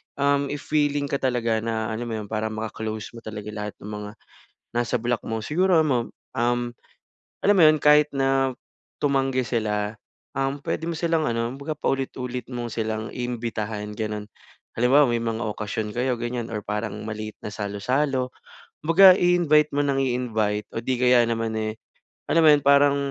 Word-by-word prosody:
um, 140 Hz, 0 st, +2 dB
if 145 Hz, +1 st, -5 dB
willing 145 Hz, -2 st, +1 dB
ka 140 Hz, -, 0 dB
talaga 120 Hz, -3 st, +1 dB
na 110 Hz, -1 st, -1 dB
alam 115 Hz, +2 st, -4 dB
mo -, -, -2 dB
'yon, 105 Hz, -1 st, -6 dB
para 110 Hz, +1 st, -2 dB
maka-close 110 Hz, 0 st, -5 dB
mo -, -, -8 dB
talaga 105 Hz, -1 st, -7 dB
lahat 105 Hz, -1 st, -5 dB
ng -, -, -7 dB
mga 105 Hz, 0 st, -6 dB, 0.7 s
nasa 120 Hz, 0 st, +1 dB
block 120 Hz, -1 st, -1 dB
mo. 110 Hz, 0 st, -2 dB
Siguro, 175 Hz, -, +3 dB
yun 155 Hz, -, 0 dB
mam 120 Hz, -2 st, 0 dB, 0.3 s
um, 120 Hz, +1 st, +2 dB, 0.8 s
alam 205 Hz, -, +5 dB
mo -, -, +7 dB
'yon, 155 Hz, 0 st, +5 dB
kahit 150 Hz, 0 st, +6 dB
na 135 Hz, -1 st, +2 dB, 0.5 s
tumanggi 135 Hz, -2 st, +1 dB
sila, 105 Hz, -2 st, -1 dB, 0.4 s
um, 135 Hz, +1 st, 0 dB
pwede -, -, -2 dB
mo -, -, -2 dB
silang 165 Hz, -1 st, +1 dB
ano, 115 Hz, -3 st, 0 dB
kumbaga 140 Hz, +3 st, -5 dB
paulit-ulit 125 Hz, -3 st, -2 dB
mo 120 Hz, -1 st, -3 dB
silang 110 Hz, 0 st, -3 dB
imbitahan, 110 Hz, -4 st, -4 dB
gano'n. 105 Hz, -1 st, -3 dB, 0.5 s
Halimbawa, 130 Hz, +5 st, +5 dB
may 120 Hz, -1 st, 0 dB
mga 115 Hz, -1 st, -2 dB
okasyon 105 Hz, 0 st, -3 dB
kayo, 125 Hz, +1 st, +1 dB
ganyan 120 Hz, -1 st, -3 dB
or 105 Hz, -, -2 dB
parang 105 Hz, 0 st, -3 dB
maliit 110 Hz, 0 st, -5 dB
na -, -, -6 dB
salo-salo, 125 Hz, +6 st, -1 dB, 0.5 s
kumbaga 185 Hz, +5 st, +8 dB
i-invite 170 Hz, -4 st, +4 dB
mo 145 Hz, -, +2 dB
nang 140 Hz, -1 st, +1 dB
i-invite. 110 Hz, -5 st, 0 dB
O -, -, -2 dB
'di 130 Hz, +3 st, -1 dB
kaya 125 Hz, 0 st, +5 dB
naman, 115 Hz, -1 st, -1 dB
eh, 110 Hz, 0 st, -2 dB, 0.5 s
alam 165 Hz, -, +4 dB
mo -, -, +8 dB
'yon, 145 Hz, -1 st, +5 dB
parang 140 Hz, 0 st, +5 dB
120 Hz, 170 wpm, -24 LUFS, 110-140 Hz, 0.8 s, kumbaga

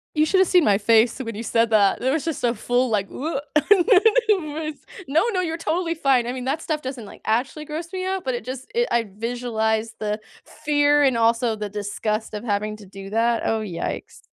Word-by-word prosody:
You 305 Hz, -, +4 dB
shoulda 375 Hz, +3 st, +4 dB
seen 355 Hz, -2 st, +4 dB
my 200 Hz, -2 st, +4 dB
face 225 Hz, +4 st, +3 dB
when 230 Hz, -4 st, -5 dB
you 225 Hz, -, -5 dB
said 230 Hz, 0 st, +1 dB
that. 205 Hz, -2 st, +4 dB
There 260 Hz, +3 st, +1 dB
was 315 Hz, -, -1 dB
just 325 Hz, -4 st, -3 dB
a 235 Hz, 0 st, +1 dB
full, 245 Hz, +3 st, 0 dB
like, 200 Hz, -3 st, 0 dB
woot 285 Hz, 0 st, -4 dB
on -, -, +2 dB, 0.2 s
my 390 Hz, -8 st, +3 dB
face -, -, -20 dB, 0.2 s
no, 320 Hz, +10 st, +3 dB
no, 365 Hz, -, +1 dB
you're 330 Hz, -2 st, -2 dB
totally 335 Hz, +1 st, -1 dB
fine, 270 Hz, -6 st, +2 dB
I -, -, -1 dB
mean, 255 Hz, 0 st, -5 dB
that 300 Hz, +4 st, -1 dB
stuff 310 Hz, -2 st, -2 dB
doesn't, 255 Hz, -4 st, -6 dB
like, -, -, -13 dB
actually 265 Hz, +7 st, -1 dB
gross 330 Hz, +4 st, -6 dB
me 370 Hz, 0 st, -3 dB
out, 380 Hz, -1 st, -2 dB
but 260 Hz, -, -1 dB
it 240 Hz, -2 st, -5 dB
just 260 Hz, 0 st, -7 dB
it 480 Hz, +1 st, +1 dB
I 235 Hz, -1 st, +2 dB
visualize 225 Hz, -1 st, -2 dB
the 210 Hz, 0 st, -2 dB, 0.3 s
fear 290 Hz, -1 st, +2 dB
and 260 Hz, -4 st, +3 dB
also 230 Hz, 0 st, +2 dB
the 210 Hz, -1 st, -5 dB
disgust 210 Hz, +2 st, -3 dB
of 210 Hz, -, -5 dB
having 215 Hz, -1 st, -2 dB
to 205 Hz, -, -13 dB
do 195 Hz, 0 st, -10 dB
that, 230 Hz, +2 st, +1 dB
oh, 225 Hz, -, +1 dB
yikes. 195 Hz, -6 st, -5 dB
245 Hz, 220 wpm, -23 LUFS, 220-310 Hz, 0.3 s, You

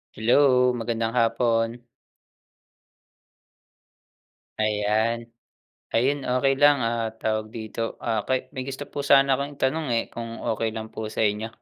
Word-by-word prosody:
Hello, 125 Hz, +2 st, +4 dB
magandang 115 Hz, 0 st, -2 dB
hapon. 115 Hz, 0 st, +1 dB, 2.7 s
Ayan. 110 Hz, +2 st, 0 dB, 0.7 s
Ayun 135 Hz, +4 st, +1 dB
okey 135 Hz, +2 st, +1 dB
lang. 145 Hz, -3 st, +5 dB
Ah, 115 Hz, 0 st, 0 dB
tawag 110 Hz, -1 st, -2 dB
dito, 115 Hz, 0 st, -4 dB, 0.6 s
may 130 Hz, -3 st, -5 dB
gusto 135 Hz, +1 st, -5 dB
po -, -, -5 dB
sana 135 Hz, -1 st, +5 dB
akong 140 Hz, +1 st, -4 dB
tanong 150 Hz, +3 st, -1 dB
eh, 115 Hz, -, +1 dB
kung 115 Hz, 0 st, -7 dB
okey 110 Hz, 0 st, -1 dB
lang 110 Hz, 0 st, -6 dB
po 110 Hz, -, -5 dB
sa 110 Hz, -, -1 dB
inyo. 105 Hz, +1 st, 0 dB
115 Hz, 120 wpm, -25 LUFS, 110-130 Hz, 2.7 s, lang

